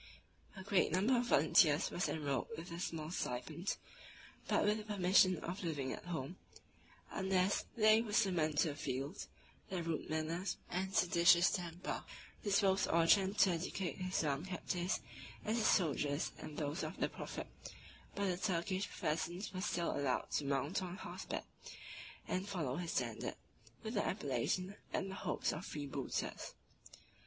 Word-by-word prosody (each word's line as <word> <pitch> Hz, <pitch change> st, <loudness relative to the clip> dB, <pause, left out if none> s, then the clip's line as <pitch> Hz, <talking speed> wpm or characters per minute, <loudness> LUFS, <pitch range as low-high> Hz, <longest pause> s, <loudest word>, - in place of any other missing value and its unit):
A 190 Hz, -, -8 dB
great 195 Hz, -4 st, +3 dB
number 200 Hz, +9 st, +3 dB
of 240 Hz, 0 st, +1 dB
volunteers 150 Hz, -2 st, +5 dB
was 180 Hz, -, 0 dB
enrolled 145 Hz, -4 st, -1 dB
with 170 Hz, +1 st, -7 dB
a 170 Hz, -, -5 dB
small 165 Hz, -4 st, -3 dB
stipend, 155 Hz, +4 st, -2 dB, 0.7 s
but -, -, +3 dB
with 210 Hz, +1 st, +2 dB
the -, -, -6 dB
permission 185 Hz, -3 st, +4 dB
of 180 Hz, +3 st, -4 dB
living 145 Hz, -6 st, -2 dB
at -, -, -8 dB
home, 170 Hz, 0 st, -4 dB, 0.7 s
unless 190 Hz, 0 st, +1 dB
they 215 Hz, 0 st, +6 dB
were 225 Hz, -2 st, -5 dB
summoned 180 Hz, -8 st, +2 dB
to 165 Hz, -, +4 dB
the 145 Hz, -, -4 dB
field: 135 Hz, +1 st, -3 dB, 0.4 s
their 185 Hz, -3 st, -2 dB
rude 165 Hz, -1 st, -2 dB
manners, 160 Hz, +4 st, -1 dB
and 190 Hz, +2 st, -2 dB
seditious 175 Hz, 0 st, +6 dB
temper, 175 Hz, 0 st, -3 dB, 0.4 s
disposed 195 Hz, -2 st, +3 dB
Orchan 190 Hz, +4 st, +4 dB
to 190 Hz, -, +6 dB
educate 175 Hz, +1 st, -2 dB
his 185 Hz, -2 st, -1 dB
young 145 Hz, 0 st, 0 dB
captives 180 Hz, -1 st, -2 dB, 0.4 s
as 220 Hz, +2 st, +1 dB
his 220 Hz, -, +3 dB
soldiers 150 Hz, -4 st, +2 dB
and 150 Hz, -, -8 dB
those 145 Hz, +1 st, -2 dB
of 160 Hz, +3 st, -4 dB
the -, -, +1 dB
prophet; -, -, -6 dB, 0.7 s
but 200 Hz, -, 0 dB
the 180 Hz, -2 st, 0 dB
Turkish 185 Hz, +1 st, -1 dB
peasants 175 Hz, +6 st, -2 dB
were 185 Hz, -, -3 dB
still 175 Hz, -4 st, 0 dB
allowed 135 Hz, -3 st, 0 dB
to 145 Hz, -, 0 dB
mount 140 Hz, +7 st, 0 dB
on 180 Hz, 0 st, -5 dB
horseback, -, -, -5 dB, 0.8 s
and 185 Hz, +2 st, -2 dB
follow 155 Hz, -9 st, -2 dB
his 175 Hz, -2 st, -3 dB
standard, 120 Hz, -3 st, -2 dB, 0.5 s
with 220 Hz, -, -4 dB
the 205 Hz, -, +1 dB
appellation 185 Hz, -, -1 dB
and 195 Hz, -, -1 dB
the -, -, -5 dB
hopes -, -, -1 dB
of 160 Hz, -, -5 dB
freebooters. 145 Hz, -5 st, -4 dB
175 Hz, 155 wpm, -37 LUFS, 155-190 Hz, 0.8 s, they